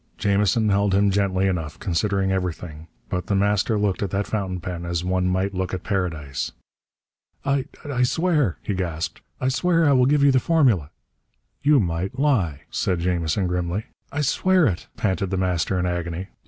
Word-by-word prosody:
Jamison 105 +2 +2
held 100 -1 +2
him 100 0 +3
gently 95 -1 +1
enough, 85 -6 -2
considering 95 +2 0
everything, 85 -4 -4 0.2
but 90 - -3
The 100 - +1
Master 105 +2 +2
looked 100 -2 0
at 100 - -1
that 100 +3 -1
fountain 95 -4 -2
pen 85 0 -5
as 85 0 -2
one 90 0 0
might 95 +2 0
look 95 0 -2
at 90 - -7
Paradise. 80 - -2 0.9
"I 140 -1 +1 0.2
I 140 -4 -1
swear," 150 - +2
he 105 - -2
gasped. 85 -4 -3 0.2
"I 130 - +1
swear 165 +5 +2
I - - +5
will 130 -2 +4
give 145 0 +3
you 140 - +6
the 130 - +4
formula!" 125 - +2 0.7
"You 145 0 +5
might 90 +4 -2
lie," 105 - +1
said 90 -2 0
Jamison 85 +1 0
grimly. 90 +4 -2 0.3
"I 145 - -1
swear 185 +5 +3
it!" 95 -9 -1
panted 95 -2 0
The 95 - -1
Master 90 0 0
in 90 - 0
agony. 85 +1 -3
95 Hz, 175 wpm, -23 LUFS, 90-115 Hz, 0.9 s, you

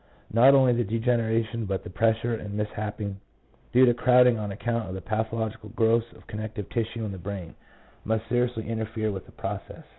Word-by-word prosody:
Not 130 +5 +7
only 130 -2 +5
the 120 0 +1
de 110 +2 -2
generation 115 -1 0
but 95 -1 -2
the - - -8
pressure 115 +3 +1
and 105 -2 -4
misshaping, 105 -1 -3 0.5
due 130 +1 +7
to 120 - +5
crowding 125 -1 +5
on 105 -1 -3
account 115 +1 -2
of 95 - -9
pathological 110 0 -2
growths 115 +1 +2
of - - -17
con 105 - -6
nective 110 -2 -5
tissue 115 -1 -2
in 105 - -4
the 95 - -7
brain, 95 -2 -6 0.5
must 110 +1 -1
seriously 120 -2 0
interfere 110 -1 -2
with 95 -2 -6
the - - -15
process. - - -6
110 Hz, 185 wpm, -27 LUFS, 105-115 Hz, 0.5 s, Not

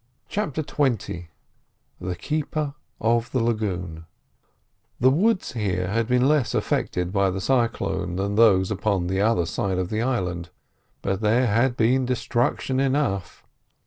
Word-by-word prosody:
CHAPTER 160 -7 -2
XX 120 - -1 0.7
THE 90 0 -3
KEEPER 150 - -2 0.3
OF 115 +1 +1
THE 130 - +1
LAGOON 95 -8 -2 0.9
The 130 +2 +5
woods 195 +8 +1
here 95 -6 -1
had 115 +2 0
been 125 +1 +3
less 150 -4 +2
affected 90 0 -1
by 100 -1 +3
the 95 +1 -3
cyclone 115 -6 0
than 100 +2 -1
those 100 -3 +4
upon 100 -3 0
the 95 +2 0
other 105 -5 +2
side 95 +3 -2
of 90 -1 -1
the 110 +1 0
island, 90 -9 -2 0.5
but 95 +1 -1
there 115 +4 +3
had 120 +3 +2
been 125 +3 +2
destruction 125 +1 0
enough. 135 -9 -1
110 Hz, 140 wpm, -24 LUFS, 95-130 Hz, 0.9 s, The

